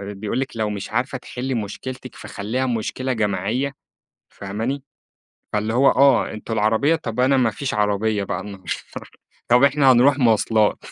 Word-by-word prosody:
بيقول 105 Hz, +5 st, -3 dB
لِك 130 Hz, -4 st, -4 dB
لو 110 Hz, -1 st, 0 dB
مش 100 Hz, -1 st, -5 dB
عارفة 125 Hz, +3 st, -1 dB
تحلي 130 Hz, +1 st, -5 dB
مشكلتِك 125 Hz, +4 st, -6 dB
فخليها 120 Hz, +6 st, -3 dB
مشكلة 125 Hz, +2 st, -2 dB
جماعية، 110 Hz, +6 st, -1 dB, 0.6 s
فاهماني؟ 110 Hz, +8 st, -4 dB, 0.7 s
فاللي 105 Hz, +1 st, -1 dB
هو 135 Hz, +2 st, +5 dB
آه، 135 Hz, -1 st, +4 dB
أنتم 110 Hz, +1 st, -5 dB
العربيّة 110 Hz, +8 st, +2 dB
طب 120 Hz, -5 st, -4 dB
أنا 135 Hz, +2 st, +4 dB
ما 125 Hz, -3 st, +3 dB
فيش 135 Hz, +4 st, -4 dB
عربيّة 105 Hz, 0 st, 0 dB
بقى 95 Hz, -1 st, -3 dB
النهارده، 100 Hz, -2 st, -10 dB, 0.8 s
طب 125 Hz, +2 st, +5 dB
إحنا 140 Hz, -1 st, +5 dB
هنروح 135 Hz, +4 st, +4 dB
مواصلات، 110 Hz, -3 st, +3 dB
115 Hz, 150 wpm, -22 LUFS, 105-130 Hz, 0.8 s, هو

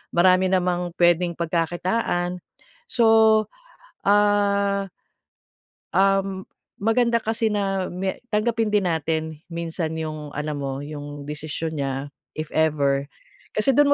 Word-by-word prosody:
marami 185 Hz, +1 st, +5 dB
namang 180 Hz, -1 st, 0 dB
puwedeng 175 Hz, 0 st, +3 dB
pagkakitaan. 175 Hz, +2 st, -1 dB, 0.5 s
So, 235 Hz, -, +3 dB, 1.0 s
ah 200 Hz, -1 st, +3 dB, 1.1 s
Um, 195 Hz, -1 st, +1 dB, 0.3 s
maganda 235 Hz, +2 st, +2 dB
kasi 225 Hz, +1 st, 0 dB
na 195 Hz, -2 st, 0 dB
may 190 Hz, +1 st, -3 dB, 0.2 s
tanggapin 220 Hz, 0 st, +1 dB
din 200 Hz, -4 st, +3 dB
natin 160 Hz, 0 st, -2 dB
minsan 165 Hz, -1 st, -3 dB
yung 155 Hz, -2 st, -5 dB
alam 150 Hz, 0 st, -3 dB
mo 135 Hz, -1 st, -4 dB
yung 145 Hz, 0 st, -7 dB
desisyon 155 Hz, +2 st, -4 dB
niya. 135 Hz, 0 st, -3 dB, 0.2 s
If 155 Hz, -1 st, -5 dB
ever, 140 Hz, -3 st, +1 dB, 0.5 s
kasi 270 Hz, -2 st, +2 dB
dun 290 Hz, -1 st, +6 dB
175 Hz, 110 wpm, -23 LUFS, 155-200 Hz, 1.1 s, dun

